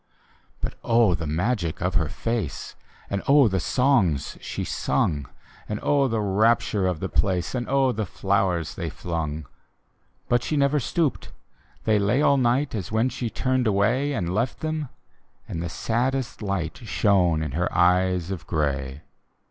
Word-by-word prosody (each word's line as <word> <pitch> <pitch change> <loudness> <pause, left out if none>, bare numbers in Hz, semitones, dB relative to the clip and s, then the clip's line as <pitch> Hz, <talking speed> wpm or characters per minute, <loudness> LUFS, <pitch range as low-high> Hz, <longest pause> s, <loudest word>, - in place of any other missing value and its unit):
But - - -2
oh, 115 -5 +4
the 80 -2 -3
magic 85 +2 -1
of 90 +2 -1
her 80 -4 +1
face. 115 - -3 0.3
And 100 -1 -2
oh 140 -2 +6
the 95 -2 0
songs 105 - +1
she - - -4
sung. 70 -4 -1 0.4
And 105 0 -2
oh 140 -2 +3
the 115 -3 -1
rapture 105 -1 +2
of 90 -4 -1
the - - -1
place, 90 -3 0
And 120 -2 -2
oh 135 -1 +3
the 110 -3 -3
flowers 95 -4 0
they - - -4
flungl 80 -3 -4 0.8
But 120 0 +2
she 155 - -1
never 140 +1 +3
stooped: 145 +3 -1 0.5
they 110 -1 +3
lay 100 +6 +2
all 140 - +4
night, 130 +3 +1
As 105 -4 -4
when 110 +3 +2
she 120 -2 -4
turned 130 +2 0
away, 115 +8 +2
And 90 -8 -2
left 115 +5 -1
them 155 -3 -2 0.3
— - - -40
and 80 - -4
the 85 - -3
saddest 125 +7 -1
light 95 -5 -2
Shone 95 -8 +2
in 75 - -3
her 85 +3 -1
eyes 90 0 +2
of 80 -5 -6
grey. 70 -3 -2
100 Hz, 165 wpm, -25 LUFS, 85-125 Hz, 0.8 s, oh